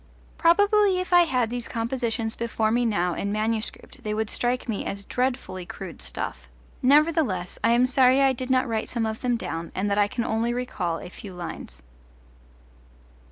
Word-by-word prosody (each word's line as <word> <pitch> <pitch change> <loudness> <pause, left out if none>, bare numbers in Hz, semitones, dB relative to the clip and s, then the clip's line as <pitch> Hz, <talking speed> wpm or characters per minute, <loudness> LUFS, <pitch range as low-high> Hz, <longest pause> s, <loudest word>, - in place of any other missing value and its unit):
Probably 405 +3 +4
if 365 0 -3
I 350 -1 +7
had 250 -6 0
these 245 -1 -4
compositions 230 -1 -2
before 225 -2 -1
me 240 +1 +2
now 180 -6 +1
in 200 +4 -3
manuscript 215 +1 -3
they 210 0 -2
would 220 0 -1
strike 245 +1 0
me 220 -4 -2
as 200 0 -5
dreadfully 245 -7 -2
crude 180 0 -8
stuff; 65 - -5 0.3
nevertheless 285 - +2
I 230 +2 +4
am 245 +1 +4
sorry 255 0 +4
I 270 -1 +4
did 255 +1 -5
not 260 0 +3
write 225 -2 -2
some 235 -2 -1
of 220 0 -4
them 245 -2 +1
down 165 -4 -5
and 200 +2 -1
that 200 - +2
I 205 - +4
can 235 +2 -3
only 230 +1 0
recall 185 -9 -2
a - - -9
few 190 0 -10
lines. 65 - -8
230 Hz, 180 wpm, -25 LUFS, 205-255 Hz, 0.3 s, I